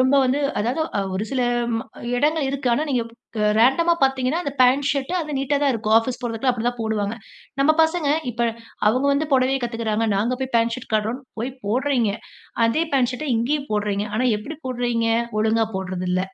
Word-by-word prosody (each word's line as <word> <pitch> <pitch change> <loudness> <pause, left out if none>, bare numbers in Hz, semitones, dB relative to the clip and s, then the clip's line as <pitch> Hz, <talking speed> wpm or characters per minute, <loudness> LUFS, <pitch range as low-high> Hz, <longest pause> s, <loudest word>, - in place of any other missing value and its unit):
ரொம்ப 260 +2 +4
வந்து 260 +3 +1 0.2
அதாவது 240 +9 -1 0.2
அ - - +2
ஒரு 200 +3 -1
சில 265 - 0 0.4
ம - - 0 0.4
இடங்கள் 300 +2 +1
இருக்கு. 275 -1 -2
ஆனா, 295 - 0
நீங்க 250 -3 +1 0.4
அ - - +2 0.2
ரேண்டமா 335 +8 +4
பார்த்தீங்கன்னா, 265 +4 +2
அந்த 280 - -2
பேண்ட் 270 +3 +4
ஷர்ட், 275 +4 -2
அது 300 -3 -4
நீட்டாதான் 280 0 +1
இருக்கும். 220 -1 +1
ஆஃபீஸ் 245 +2 -4
போறதுக்குலாம் 240 +2 0
அப்பிடிதான் 245 +1 -2
போடுவாங்க. 220 -1 -1 0.4
நம்ம 310 +3 +5
பசங்க 320 -1 +1 0.2
இப்ப 235 +1 0 0.4
அவுங்க 255 +6 +1
வந்து 290 +2 0
புடவைய 265 0 +3
கத்துக்கிறாங்க. 225 -2 -1
நாங்க 235 +5 0
போய் 265 - -4
பேண்ட் 230 0 +2
ஷர்ட் 255 - -11
காட்டுறோன்னு 225 +5 -1 0.2
போய் 250 +3 -3
போடுறீங்க. 245 0 +1 0.6
அதே 310 +9 +1
பேண்ட் 255 -2 +3
ஷர்ட 305 +5 -5
இங்கேயும் 280 +5 -1
போடுறீங்க! 205 -1 -1
ஆனா, 250 +4 +1
எப்பிடி 295 +8 -8
போடுறீங்க? 240 -2 0 0.3
ஒழுங்கா 220 +1 +2
போட்றது 185 -1 -4
இல்ல. 185 - +1
250 Hz, 180 wpm, -22 LUFS, 225-275 Hz, 0.6 s, நம்ம